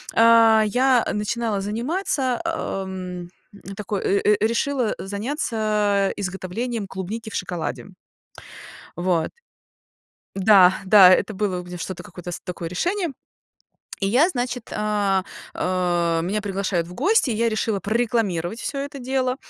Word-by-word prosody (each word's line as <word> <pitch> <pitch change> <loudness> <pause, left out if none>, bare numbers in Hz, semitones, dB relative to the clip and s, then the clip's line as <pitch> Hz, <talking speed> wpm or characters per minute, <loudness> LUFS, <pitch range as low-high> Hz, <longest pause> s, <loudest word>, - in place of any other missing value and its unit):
А, 230 -1 +6
я 250 +2 +3
начинала 210 0 -1
заниматься, 260 - -1
ам, 185 -2 -4 0.5
такой, 205 -1 -3
э, 200 - +2
э, 210 0 +4
решила, 240 0 0
э, - - -7
заняться 210 -3 0
изготовлением 200 +4 -4
клубники 195 +4 -6
в - - -7
шоколаде. 175 0 -4 1.1
Вот. 175 -2 0 1.0
Да, 190 -2 +6
да, 190 -2 +8
это 185 - +3
было 190 -2 -1
у - - -10
меня 180 0 -8
что-то 175 +1 -5
какое-то 175 0 -8
с - - -5
такое 175 -2 -6
решение. 350 - -1 0.9
И 195 - +1
я 260 - +4
значит 245 -6 -4
а, 205 -3 0 0.3
а, 175 -2 0
меня 195 +5 -1
приглашают 195 -4 -1
в 180 - -10
гости, 325 - +2
и - - 0
я 230 +1 +2
решила 215 -2 -1
прорекламировать 215 -4 -1
всё 275 - -3
это 280 0 -5
дело. 255 0 -1
210 Hz, 130 wpm, -23 LUFS, 185-235 Hz, 1.1 s, да